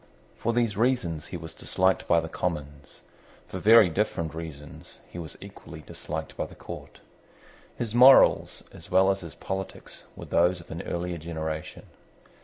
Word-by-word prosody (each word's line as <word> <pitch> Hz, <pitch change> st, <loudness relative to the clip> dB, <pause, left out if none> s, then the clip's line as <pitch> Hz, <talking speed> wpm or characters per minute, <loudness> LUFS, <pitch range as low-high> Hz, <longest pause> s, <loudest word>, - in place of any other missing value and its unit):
For 115 Hz, -, -1 dB
these 115 Hz, -3 st, +1 dB
reasons 110 Hz, -9 st, 0 dB
he -, -, -6 dB
was 80 Hz, -1 st, -9 dB
disliked 95 Hz, +3 st, 0 dB
by 85 Hz, -, +4 dB
the 80 Hz, -, -5 dB
Commons. 75 Hz, -4 st, -5 dB, 0.5 s
For -, -, -6 dB
very 110 Hz, -1 st, +7 dB
different 85 Hz, -3 st, -1 dB
reasons 80 Hz, -3 st, -9 dB
he 85 Hz, -, -9 dB
was 80 Hz, -2 st, -8 dB
equally 90 Hz, -5 st, -11 dB
disliked 80 Hz, +1 st, -6 dB
by -, -, -3 dB
the -, -, -14 dB
Court. -, -, -10 dB, 0.8 s
His 115 Hz, -3 st, -3 dB
morals 130 Hz, +3 st, +6 dB
as -, -, -13 dB
well 95 Hz, +1 st, +5 dB
as 95 Hz, -, -2 dB
his 85 Hz, -5 st, -9 dB
polities 95 Hz, 0 st, -6 dB
were -, -, -9 dB
those 90 Hz, +1 st, +2 dB
of 85 Hz, -, -14 dB
an 85 Hz, -, -5 dB
earlier 85 Hz, 0 st, -4 dB
generation. 80 Hz, -1 st, -5 dB
85 Hz, 160 wpm, -27 LUFS, 80-100 Hz, 0.8 s, very